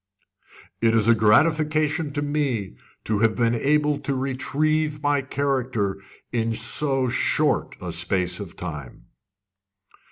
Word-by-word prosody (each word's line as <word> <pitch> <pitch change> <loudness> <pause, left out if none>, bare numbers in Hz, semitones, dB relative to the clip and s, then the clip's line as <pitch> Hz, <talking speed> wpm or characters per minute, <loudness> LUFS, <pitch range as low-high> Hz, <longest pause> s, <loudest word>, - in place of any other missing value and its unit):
"It 115 -1 +3
is 110 -1 +3
a 115 - +7
gratification 150 +7 +2
to 145 0 -1
me 140 - -2 0.3
to 110 -2 -1
have 110 0 +2
been 115 -1 +2
able 150 +4 +1
to 140 - -3
retrieve 150 +3 -1
my 145 -1 +2
character 130 -7 -1 0.3
in 115 -1 -1
so 130 +4 +1
short 120 - +1
a - - -5
space 90 -2 -1
of 100 -5 -8
time." 75 -8 -8
130 Hz, 125 wpm, -24 LUFS, 110-145 Hz, 0.3 s, a